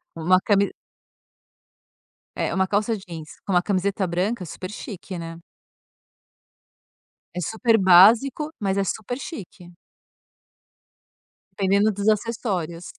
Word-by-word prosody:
uma 175 +3 +3
cami 200 -1 +2 1.7
É, - - -1
uma 190 0 +1
calça 210 +3 0
jeans 170 -6 -9 0.2
com 195 - -2
uma 175 -1 +4
camiseta 195 0 0
branca, 185 +4 -2
super 185 +3 -7
chique, 200 -3 -8
né. 165 0 -7 1.9
É 180 - -4
super 225 +5 +1
básico, 220 - +5
mas 195 -2 0
é 200 - +1
super 220 +6 -4
chique. 185 -8 -9 1.8
Dependendo 200 +2 +2
dos 200 +2 -2
acessórios. 200 -6 -1
195 Hz, 105 wpm, -23 LUFS, 180-215 Hz, 1.9 s, básico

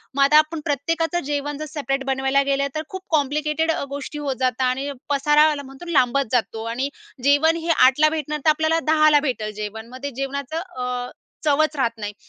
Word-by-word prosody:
मग 280 - +4
आता 290 +2 +6
आपण 310 +1 +2
प्रत्येकाचं 325 +4 0
जेवण 290 0 -3
जसं 305 0 -7
सेपरेट 270 -1 -1
बनवायला 270 +1 +1
गेलं 280 0 0
तर, 310 - -1
खूप 375 - -6
कॉम्प्लिकेटेड 300 +1 +1
अ, 320 - -2
गोष्टी 285 +1 -6
होत 280 -3 -2
जाता 255 0 +1
आणि 265 +3 -1 0.2
पसारा 295 +2 +4
याला 290 -2 -3
म्हणतो 270 +4 -12
लांबत 275 -2 +3
जातो 225 -2 0
आणि 265 +4 -2 0.3
जेवण 285 +4 +4
हे 335 - -4
8ला 285 +4 +5
भेटणार 300 -1 -3
तर - - +6
आपल्याला 315 +1 +2
10ला 305 -1 +5
भेटलं 250 -7 -2
जेवण. 215 +1 -6
मग - - -7
ते 285 - -2
जेवणाचं 275 +3 -4 0.2
अ, 250 0 -3 0.3
चवच 305 +1 +2
राहत 260 -5 +1
नाही. 210 -1 -5
280 Hz, 190 wpm, -22 LUFS, 265-305 Hz, 0.3 s, आता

